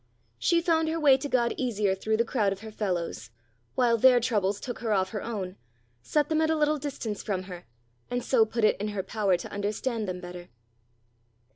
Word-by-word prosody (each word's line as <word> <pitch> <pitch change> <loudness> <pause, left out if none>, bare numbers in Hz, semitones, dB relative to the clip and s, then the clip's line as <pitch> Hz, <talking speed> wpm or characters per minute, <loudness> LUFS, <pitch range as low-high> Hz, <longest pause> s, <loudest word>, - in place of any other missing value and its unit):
She 340 -1 +3
found 325 -2 +2
her 325 +1 -1
way 285 -4 +6
to 285 +2 -5
God 240 -3 +2
easier 215 -6 0
through 220 +3 -1
the 230 - +2
crowd 215 -5 +1
of 195 +1 -5
her 220 0 -8
fellows; 175 - -3 0.5
while 235 -3 +3
their 255 +1 +7
troubles 205 -4 0
took 245 - -6
her 230 -2 -2
off 190 -2 +1
her 210 - -3
own, 195 -5 -5 0.4
set 295 - +1
them 315 0 +1
at 315 - +2
a 320 - +3
little 300 0 +2
distance 255 -7 -4
from 190 -3 -2
her, 180 -2 -10 0.4
and 245 0 -2
so 245 -4 +4
put 220 +1 -2
it 215 - +3
in 210 - -1
her 205 -2 -3
power 195 -2 +1
to - - -8
understand 210 +2 -2
them 180 -1 -4
better. 175 -1 -9
220 Hz, 210 wpm, -28 LUFS, 195-260 Hz, 0.5 s, their